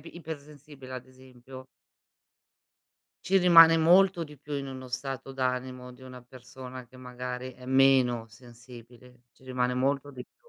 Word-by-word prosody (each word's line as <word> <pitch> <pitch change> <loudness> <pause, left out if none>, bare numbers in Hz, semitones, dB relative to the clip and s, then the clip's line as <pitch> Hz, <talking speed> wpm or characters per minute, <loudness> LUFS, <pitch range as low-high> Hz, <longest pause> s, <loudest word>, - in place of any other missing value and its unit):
ipersensibile 150 -5 -11
ad 130 0 -8
esempio 130 0 -14 1.6
ci 195 - +1
rimane 165 -3 +8
molto 175 +2 +4
di 150 -2 -14
più 145 +2 -11
in 140 -1 -4
uno 130 -1 -8
stato 135 +1 -6
d'animo 125 -1 -4
di 125 - -18
una 130 -1 -11
persona 125 0 -11
che 130 +2 -18
magari 125 0 -7
è 125 +1 -15
meno 130 -3 +3
sensibile, 120 +1 -16
ci - - -27
rimane 125 -1 -1
molto 140 +2 -1
di 125 -1 -9
più. 480 - -30
130 Hz, 145 wpm, -28 LUFS, 125-140 Hz, 1.6 s, rimane